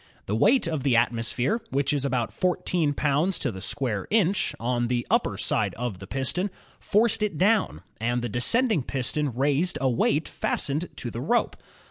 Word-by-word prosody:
The 105 Hz, -, -1 dB
weight 225 Hz, -, +4 dB
of 160 Hz, -4 st, -2 dB
the 130 Hz, -2 st, +2 dB
atmosphere, 120 Hz, -, +1 dB
which 140 Hz, +1 st, 0 dB
is 140 Hz, -2 st, 0 dB
about 125 Hz, -4 st, -1 dB
fourteen 175 Hz, -4 st, 0 dB
pounds 150 Hz, +7 st, +1 dB
to -, -, -2 dB
the 95 Hz, -2 st, -8 dB
square 105 Hz, -2 st, -2 dB
inch, 205 Hz, -3 st, +2 dB
on 120 Hz, +1 st, 0 dB
the 120 Hz, -1 st, -1 dB
upper -, -, +1 dB
side -, -, 0 dB
of 115 Hz, -6 st, -4 dB
the 100 Hz, -, -9 dB
piston, 135 Hz, -, -1 dB, 0.3 s
forced 215 Hz, +1 st, +2 dB
it 205 Hz, -7 st, -1 dB
down, 205 Hz, +4 st, +2 dB, 0.2 s
and 120 Hz, +2 st, -1 dB
the -, -, -1 dB
descending 180 Hz, -, +2 dB
piston 135 Hz, +3 st, -2 dB
raised 140 Hz, +8 st, +1 dB
a 135 Hz, -, +1 dB
weight 145 Hz, +6 st, +1 dB
fastened 150 Hz, +5 st, -2 dB
to 120 Hz, -, -5 dB
the 115 Hz, -, -5 dB
rope. 235 Hz, -, +1 dB
140 Hz, 175 wpm, -26 LUFS, 120-180 Hz, 0.3 s, weight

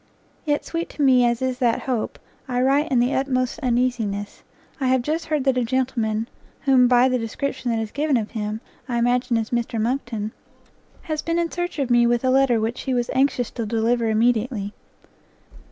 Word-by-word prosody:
Yet 295 Hz, -1 st, 0 dB
sweet 335 Hz, 0 st, -3 dB
to 295 Hz, -, -3 dB
me 255 Hz, -2 st, +5 dB
as 235 Hz, +1 st, -1 dB
is 255 Hz, -1 st, -1 dB
that 240 Hz, -3 st, +1 dB
hope, 250 Hz, -5 st, -2 dB, 0.3 s
I 250 Hz, -1 st, -1 dB
write 280 Hz, +4 st, +2 dB
in 255 Hz, -, +3 dB
the 245 Hz, +3 st, +2 dB
utmost 255 Hz, 0 st, 0 dB
uneasiness; 235 Hz, -6 st, -1 dB, 0.4 s
I 265 Hz, -, 0 dB
have 255 Hz, -1 st, +2 dB
just 315 Hz, +4 st, -2 dB
heard 305 Hz, -3 st, 0 dB
that 260 Hz, -2 st, +2 dB
a -, -, +1 dB
gentleman, 230 Hz, -3 st, -1 dB, 0.3 s
whom, 260 Hz, -3 st, +5 dB
by 245 Hz, +1 st, +5 dB
the 255 Hz, -1 st, +1 dB
description 245 Hz, +3 st, -3 dB
that 230 Hz, -1 st, 0 dB
is 220 Hz, -1 st, -4 dB
given 290 Hz, -2 st, +1 dB
of 220 Hz, -2 st, -3 dB
him, 215 Hz, 0 st, -4 dB, 0.3 s
I 240 Hz, -, 0 dB
imagine 245 Hz, 0 st, +2 dB
is 225 Hz, -1 st, -3 dB
Mr 235 Hz, -1 st, -1 dB
Monckton, 230 Hz, -2 st, -2 dB, 0.7 s
has 310 Hz, -2 st, -3 dB
been 335 Hz, 0 st, -1 dB
in 340 Hz, -1 st, 0 dB
search 350 Hz, 0 st, -3 dB
of 270 Hz, -4 st, -1 dB
me 240 Hz, 0 st, +5 dB
with 240 Hz, +1 st, +1 dB
a 255 Hz, -, +3 dB
letter 265 Hz, -3 st, +4 dB
which 225 Hz, +2 st, -2 dB
he 260 Hz, -2 st, -1 dB
was 240 Hz, -1 st, -1 dB
anxious 260 Hz, -3 st, +1 dB
to 230 Hz, -, -4 dB
deliver 230 Hz, +1 st, +1 dB
immediately. 220 Hz, -1 st, +1 dB
245 Hz, 195 wpm, -23 LUFS, 230-270 Hz, 0.7 s, me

